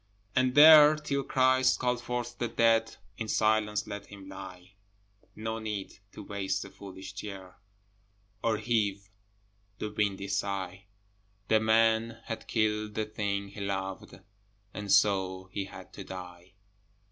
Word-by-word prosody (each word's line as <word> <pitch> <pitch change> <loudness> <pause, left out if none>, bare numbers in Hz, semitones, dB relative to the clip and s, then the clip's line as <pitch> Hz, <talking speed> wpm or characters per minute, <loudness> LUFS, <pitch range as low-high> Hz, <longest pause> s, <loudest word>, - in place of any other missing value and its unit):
And 130 0 +2
there, 150 0 +9
till 145 -2 -2
Christ 130 -1 +3
call 125 -1 +1
forth 120 0 -4
the 120 - 0
dead, 115 0 +2 0.2
In 110 - -3
silence 110 -1 +1
let 100 0 -7
him 100 -1 -12
lie: 95 -1 -10 0.6
No 110 +1 -4
need 105 -3 -5
to - - -9
waste 100 -1 -2
the - - -11
foolish 95 0 -10
tear, 95 -2 -8 0.9
Or 115 -2 +2
heave 100 -3 -1 0.7
the 105 - -4
windy 100 -2 -1
sigh: 100 -1 -3 0.6
The 110 - +5
man 110 +1 +2
had 115 - -6
killed 110 -1 0
the 110 - -1
thing 100 -2 -3
he 100 +1 -9
loved, 95 -1 -4 0.5
And 105 -1 -4
so 95 -2 +2
he 100 0 -3
had 95 - -12
to - - -8
die. 90 0 -10
105 Hz, 135 wpm, -29 LUFS, 95-115 Hz, 0.9 s, there